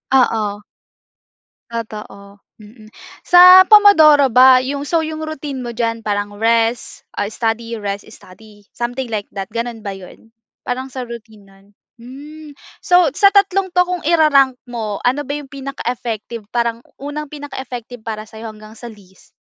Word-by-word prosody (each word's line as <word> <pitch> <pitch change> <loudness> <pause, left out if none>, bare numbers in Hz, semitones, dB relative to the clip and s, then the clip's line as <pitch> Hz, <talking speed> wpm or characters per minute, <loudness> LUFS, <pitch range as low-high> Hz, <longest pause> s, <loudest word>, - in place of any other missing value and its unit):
Oo. 215 -5 +1 1.1
Totoo. 210 -3 -9 0.2
Mm. 215 +1 -16 0.3
Sa 365 +1 +8
Pomodoro 320 -10 +7
ba, 255 +1 +7
'yong 275 +2 -3
so, 325 -2 +1
'yong 315 0 -6
routine 295 -4 -6
mo 240 - -6
diyan 230 -1 -3
parang 205 -1 -3
rest, 230 +2 -1
ah, 205 - -3
study, 230 +1 -3
rest, 205 0 -6
study, 205 0 -17
something 245 +2 -4
like 215 -3 -5
that, 195 - -4
gano’n 230 -2 -5
ba 200 - -4
‘yon? 195 +4 -14 0.3
Parang 260 +2 -4
sa 255 -1 -6
routine 220 -3 -12
no’n? 195 0 -22 0.4
Hmm, 295 +5 -12 0.3
so, 355 -6 +3
sa 395 +5 +5
tatlong 390 -1 +2
‘to, 360 0 +2
kung 360 -1 -4
ira-rank 285 -5 +3
mo, 225 -4 -5
ano 260 +4 +1
ba 285 0 -7
‘yong 290 - -9
pinaka-effective, 240 -5 -6
parang 235 -1 -2 0.2
unang 290 +1 -6
pinaka-effective 255 -5 -8
para 215 -1 -6
sa’yo 220 +1 -10
hanggang 215 0 -13
sa 235 +2 -10
least? 195 -4 -19
240 Hz, 150 wpm, -17 LUFS, 215-285 Hz, 1.1 s, Sa